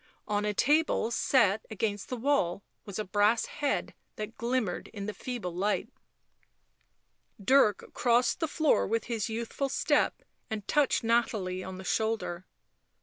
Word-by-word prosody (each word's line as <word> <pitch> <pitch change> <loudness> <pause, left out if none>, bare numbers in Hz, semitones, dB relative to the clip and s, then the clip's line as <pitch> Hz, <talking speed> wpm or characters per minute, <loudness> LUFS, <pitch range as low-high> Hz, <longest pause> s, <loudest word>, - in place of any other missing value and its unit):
On 205 0 0
a 210 - +1
table 295 -4 +2
set 220 -5 +3
against 210 -2 -2
the 250 - -3
wall 225 -8 +1 0.2
was 200 -2 -6
a 215 - -2
brass 205 +4 +3
head 290 -1 -2 0.2
that 215 +1 -6
glimmered 235 -6 -1
in 200 -3 -7
the 210 - -3
feeble 235 -9 -5
light. 200 +4 0 1.5
Dirk 215 -1 +3
crossed 240 0 +2
the 320 - 0
floor 310 0 +2
with 225 +1 0
his 230 -2 -2
youthful 235 +5 -3
step - - +1 0.3
and 215 -2 -5
touched 295 -5 +2
Nathalie 215 -5 0
on 190 0 -7
the 190 - -8
shoulder. 215 -4 -1
220 Hz, 145 wpm, -29 LUFS, 200-245 Hz, 1.5 s, set